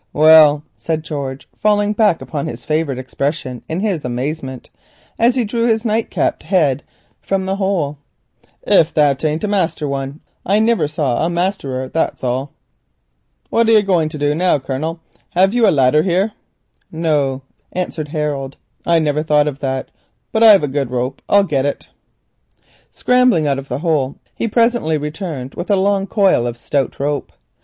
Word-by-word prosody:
"Well," 155 -1 +6
said 160 -1 -3
George, 140 -4 -5
falling 205 0 +2
back 210 -5 +2
upon 145 -3 -4
his 120 0 -7
favourite 155 -4 -1
expression 130 0 -3
in 165 +4 -2
his 195 -8 -1
amazement, 130 +2 -4 0.5
as 235 +2 +4
he 250 -3 +1
drew 230 +2 0
his 225 0 +1
nightcapped 220 0 0
head 150 -8 +1 0.4
from 195 -1 -1
the 190 +1 -2
hole, 175 -8 -1 0.6
"if 160 - +4
that 145 -2 +2
ain't 155 +3 -1
a - - +1
master 180 -6 -1
one, 140 +1 -4 0.2
I 200 +3 +2
niver 220 -6 +2
saw 145 -4 -1
a 165 - +1
masterer, 170 -8 -2
that's 160 +1 -2
all. 130 +3 -2 1.0
"What 230 0 +3
be 225 - +5
you - - +7
a 210 - +3
going 175 -6 +1
to 155 - -7
du 145 0 +1
now, 175 +1 +2
Colonel? 145 +5 -4 0.4
Hev 190 +3 +4
you 240 -2 +4
a - - +6
ladder 140 +1 +3
here?" 190 +5 +1 0.6
"No," 145 -5 0 0.3
answered 175 -4 -3
Harold, 145 -3 -3 0.3
"I 170 -1 +4
never 150 -2 +1
thought 150 -1 +2
of 140 -2 -4
that, 135 -1 -3 0.4
but 220 - 0
I've 210 -7 +7
a - - +1
good 135 -2 -2
rope: 125 +2 -3
I'll 200 0 +5
get 140 -7 0
it." 145 - -5 1.0
Scrambling 250 -10 +2
out 140 -2 0
of 135 - -9
the - - -3
hole, 145 -5 +1 0.2
he - - -2
presently 230 -8 +1
returned 150 -3 -5
with 175 - -6
a 205 - +4
long 195 0 +1
coil 195 - +2
of 120 0 -5
stout 135 +3 -2
rope. 145 +1 -2
155 Hz, 170 wpm, -18 LUFS, 140-195 Hz, 1.0 s, you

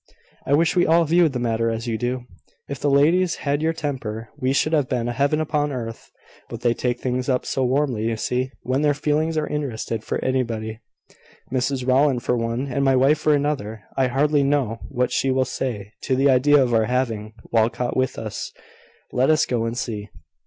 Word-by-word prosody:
"I 140 - +4
wish 165 +3 +2
we 175 - +3
all 165 +1 +4
viewed 165 -1 +3
the - - -1
matter 115 -1 0
as 115 0 -3
you 115 -2 -1
do. 125 +2 -2 0.4
If 140 -2 -5
the 145 - +1
ladies 160 +5 +3
had 145 +1 +1
your 160 +1 +2
temper, 120 -8 -4
we 130 -3 -1
should 155 +3 +1
have 145 -5 +1
a 120 -1 0
heaven 140 +5 +1
upon 150 -1 0
earth. 115 -4 -6 0.4
But - - -7
they 120 -1 +2
take 120 0 -2
things 125 +1 -2
up 130 -1 +1
so 135 - -1
warmly, 130 -4 0
you 115 -1 -1
see, 125 +3 -1
when 130 +3 0
their 145 -1 +2
feelings 155 +2 0
are 155 - +1
interested 115 -7 -3
for - - -2
anybody; 115 -4 -2 0.7
Mrs 130 0 -1
Rowland 130 -1 +3
for 125 - +1
one, 115 +2 -2
and 140 0 -1
my 135 -1 +4
wife 135 +4 +4
for 155 -1 +3
another. 125 -8 -2
I 135 -1 +2
hardly 145 +3 +2
know 135 -5 0
what 125 0 0
she 135 - +1
will 130 0 +2
say 105 -8 -4
to 130 - 0
the 135 +1 +4
idea 145 +3 +5
of 120 -2 -1
our 110 -1 +3
having 115 -3 -2 0.2
Walcot 115 +2 +1
with 130 0 0
us. - - -5 0.6
Let 130 +3 +2
us 155 -1 +4
go 120 -2 -1
and 115 +1 -3
see." 105 -3 -4
130 Hz, 200 wpm, -22 LUFS, 120-145 Hz, 0.7 s, idea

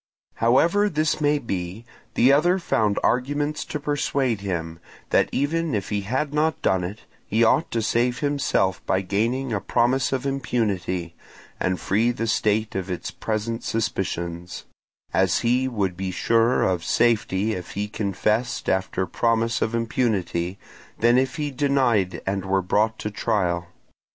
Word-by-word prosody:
However 170 - +3
this 155 -2 0
may 150 0 +3
be, 100 -4 -4 0.3
the 130 +3 +5
other 175 +6 +4
found 110 - +1
arguments 145 +4 0
to 150 - -4
persuade 140 -6 0
him, 85 -4 -4 0.3
that - - +3
even 160 0 0
if 100 -3 -3
he 105 -1 -1
had 130 +8 -2
not 155 +1 +1
done 95 -1 +2
it, 100 +5 -6 0.3
he 110 +3 +2
ought 150 +8 +3
to 115 -1 -1
save 120 +3 +1
himself 140 -10 0
by 95 - +2
gaining 115 +7 -1
a 100 - -1
promise 125 +2 +1
of 130 0 -1
impunity, 100 -10 -1 0.5
and 90 -1 0
free 110 +8 +1
the 115 -1 -2
state 110 -1 +1
of 95 0 -3
its 90 - -4
present 110 +1 -3
suspicions; 90 -5 -3 0.5
as 95 -3 +2
he 125 +2 +2
would 100 -7 -1
be 95 +1 -3
surer 115 +5 +2
of 90 -3 0
safety 110 -2 +1
if 90 -3 -6
he 105 +1 -2
confessed 110 +3 -1
after 95 0 0
promise 115 +1 0
of 115 - 0
impunity 100 -7 -1 0.4
than 120 +2 +5
if 130 0 -1
he 150 -1 -2
denied 130 -8 +1
and 95 0 -1
were 95 0 +1
brought 110 +4 +1
to 105 - -4
trial. 90 -5 0
115 Hz, 150 wpm, -24 LUFS, 95-130 Hz, 0.5 s, the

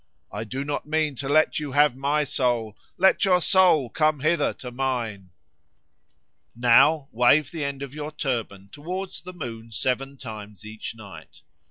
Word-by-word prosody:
I 105 +2 -5
do 130 +5 -4
not 145 0 -3
mean 155 -1 0
to 135 +1 -4
let 155 +1 +3
you 145 -3 -5
have 145 -2 +4
my 145 +3 +1
soul, 120 -6 -1 0.2
Let 190 +1 +4
your 185 -2 +4
soul 175 -6 +4
come 155 -2 +1
hither 165 +4 +2
to 125 - -8
mine." 120 -7 -3 1.3
Now 130 +5 +4
wave 135 +5 +3
the 160 -3 -4
end 140 -1 -4
of 140 -1 -8
your 150 0 -6
turban 115 -10 -4
towards 180 +6 -6
the 180 +3 -9
moon 115 -8 -7
seven 130 +4 -2
times 105 -4 -9
each 110 +1 -7
night. 100 -3 -13
135 Hz, 160 wpm, -25 LUFS, 115-155 Hz, 1.3 s, have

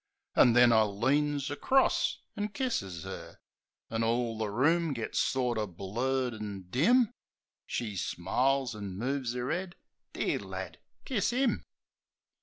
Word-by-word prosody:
An' 120 - +6
then, 120 0 +7
I 110 - +6
leans 140 +7 +1
acrost 265 - +2
an' 205 - -1
kisses 200 - -3
'er; 85 -3 -8 0.5
An' 115 0 -1
all 115 0 +1
the 110 -1 -2
room 155 +8 +2
gits 115 -4 -2
sorter 120 -5 0
blurred 120 +8 -2
an' 105 -3 -6
dim... 235 - +4 0.5
She 110 -4 -3
smiles, 125 +9 0
an' 100 -3 -6
moves 130 +1 -2
'er 125 +1 -2
'ead. 180 0 -3 0.4
"Dear - - 0
lad! - - -7 0.3
Kiss 230 -6 0
'im." 250 0 +1
125 Hz, 130 wpm, -30 LUFS, 105-145 Hz, 0.5 s, then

